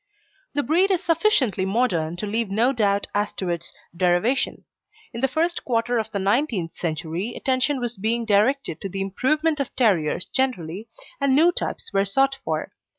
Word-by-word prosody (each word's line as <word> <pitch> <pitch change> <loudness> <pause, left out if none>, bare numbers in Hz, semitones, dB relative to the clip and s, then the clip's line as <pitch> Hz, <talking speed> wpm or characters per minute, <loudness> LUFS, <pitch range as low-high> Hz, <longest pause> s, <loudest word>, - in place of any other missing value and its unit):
The 290 - +1
breed 350 +7 +3
is 370 -3 +1
sufficiently 315 - +2
modern 190 -6 0
to 175 - -4
leave 220 +1 -1
no 230 +7 +2
doubt 205 -4 +1
as 205 0 0
to 185 - -4
its 170 0 -4 0.2
derivation. 180 +9 +1 0.5
In 235 - -5
the 270 - +3
first 330 +5 -1
quarter 235 0 0
of 220 0 -3
the 205 - -3
nineteenth 200 - 0
century 170 +6 -3
attention 260 +1 0
was 240 -3 -3
being 230 +3 0
directed 215 - +1
to 195 - -4
the 195 - -5
improvement 300 +11 0
of 275 - -1
terriers 180 -9 +2
generally, 215 -6 -2 0.3
and 275 -1 +3
new 330 +5 +5
types 350 - -4
were 195 0 +3
sought 270 +7 +2
for. - - -3
230 Hz, 170 wpm, -23 LUFS, 195-270 Hz, 0.5 s, new